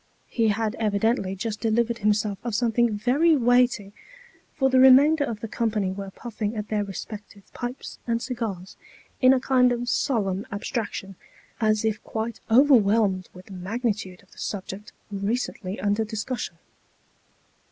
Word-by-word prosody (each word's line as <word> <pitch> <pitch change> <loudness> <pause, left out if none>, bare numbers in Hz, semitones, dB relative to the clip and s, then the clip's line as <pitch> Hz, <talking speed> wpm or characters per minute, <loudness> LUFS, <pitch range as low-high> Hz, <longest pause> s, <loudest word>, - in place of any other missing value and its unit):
He 230 -2 +1
had 215 +1 0
evidently 210 -2 0
just 215 +2 -4
delivered 235 +1 +1
himself 210 -1 +1
of 235 -3 -3
something 235 0 +2
very 285 +9 +3
weighty; 245 -5 +2 0.6
for 265 - +2
the 260 -1 +3
remainder 280 +4 +7
of 225 -6 -4
the 225 - -4
company 210 -4 -1
were 195 0 -6
puffing 220 +1 -5
at 210 -1 -5
their 210 -1 0
respective 200 0 -9
pipes 245 +2 -6
and 230 0 +1
cigars 225 -7 -5 0.4
in 255 -1 +7
a 265 - +4
kind 255 -1 +3
of 245 0 -2
solemn 205 -6 0
abstraction, 200 -2 -4 0.4
as 215 -1 +2
if 220 -1 -1
quite 225 0 -4
overwhelmed 220 -7 +4
with 180 0 -12
the 200 - -12
magnitude 200 -1 -3
of 195 - -27
the - - -16
subject 200 +1 -5 0.2
recently 200 -1 -3
under 205 +2 +1
discussion. 220 +3 -4
220 Hz, 145 wpm, -25 LUFS, 200-245 Hz, 0.6 s, remainder